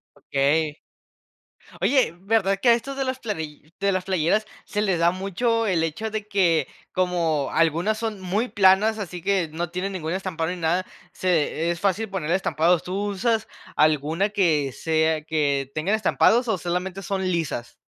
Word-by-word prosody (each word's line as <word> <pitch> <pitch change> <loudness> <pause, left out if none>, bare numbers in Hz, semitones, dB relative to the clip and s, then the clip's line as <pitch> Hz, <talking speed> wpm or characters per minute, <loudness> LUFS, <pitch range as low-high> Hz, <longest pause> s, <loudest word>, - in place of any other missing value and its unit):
Okey. 145 +2 0 1.1
Oye, 260 - +3
¿verdad 195 -2 +1
que 245 - +4
a - - +8
estos 270 +4 -3
de 270 - 0
las 260 0 -3
playi 160 - -6
de 200 0 +2
las 185 -1 -1
playeras 190 +3 +1 0.2
se 210 -2 -2
les 190 -5 +1
da 170 +1 +5
mucho 225 +5 0
el 180 -6 +1
hecho 210 +8 -3
de 215 -1 -4
que 170 -8 +2 0.2
como 170 -6 0
algunas 165 +7 +2
son 220 -3 -3
muy 205 +7 -1
planas, 205 +3 +4
así 180 -3 -6
que 190 -5 +1
no 170 +1 -3
tienen 185 +2 -3
ningún 165 -3 -3
estampado 180 -3 -2
ni - - -3
nada, 175 +3 0 0.3
se 170 -2 0
es 170 - -4
fácil 200 +3 0
ponerle 175 -3 -1
estampados? 175 -2 +2
¿Tú 180 +1 -4
usas 220 +2 0 0.3
alguna 155 +5 +2
que 160 -9 +1
sea 160 +1 0
que 140 -4 0
tengan 180 +8 +1
estampados 235 +2 +3
o 215 -4 +1
solamente 180 +2 -3
son 190 0 -2
lisas? 165 -9 -2
185 Hz, 170 wpm, -24 LUFS, 160-205 Hz, 1.1 s, a